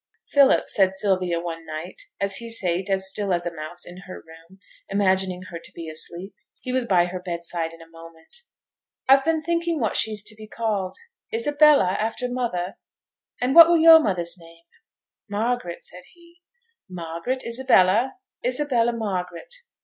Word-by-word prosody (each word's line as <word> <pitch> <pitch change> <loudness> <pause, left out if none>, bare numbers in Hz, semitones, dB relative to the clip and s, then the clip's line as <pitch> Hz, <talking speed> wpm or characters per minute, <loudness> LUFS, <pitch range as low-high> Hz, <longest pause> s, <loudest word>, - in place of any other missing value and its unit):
'Philip,' 280 -2 +4
said 190 -2 +2
Sylvia, 185 -3 0
one 165 -1 -6
night, 160 +3 -7 0.2
as 200 0 0
he 230 -1 -8
sate 185 -3 -1
as 190 0 0
still 195 0 -2
as 175 -1 0
a 175 - -3
mouse 155 +2 -8
in 175 - -11
her 185 - -9
room, 165 +3 -17 0.3
imagining 190 -2 0
her 170 - -6
to - - -13
be 165 -1 -8
asleep. 170 +4 -3 0.3
He 255 - -5
was 255 -1 0
by 180 -5 +3
her 180 +1 -5
bed 170 -2 -6
side 165 -1 -3
in 165 0 -13
a - - -18
moment. 165 - -14 0.7
'I've 270 +1 +6
been 320 +1 0
thinking 335 0 -1
what 225 -4 -1
she's 210 -1 +1
to 215 0 -2
be 215 0 -12
called. 210 -4 -3 0.4
Isabella, 295 - +4
after 225 +3 -2
mother; 235 -8 -3 0.6
and 250 +2 0
what 335 +1 +10
were 345 - +5
yo'r 325 0 +9
mother's 180 - -1
name?' 165 0 -17 0.6
'Margaret,' 215 -3 -3
said 180 - -9
he. 345 0 -22 0.5
'Margaret 175 +8 -4
Isabella; 235 -1 +2 0.3
Isabella 270 - +1
Margaret. 210 - -5
195 Hz, 165 wpm, -23 LUFS, 175-250 Hz, 0.7 s, what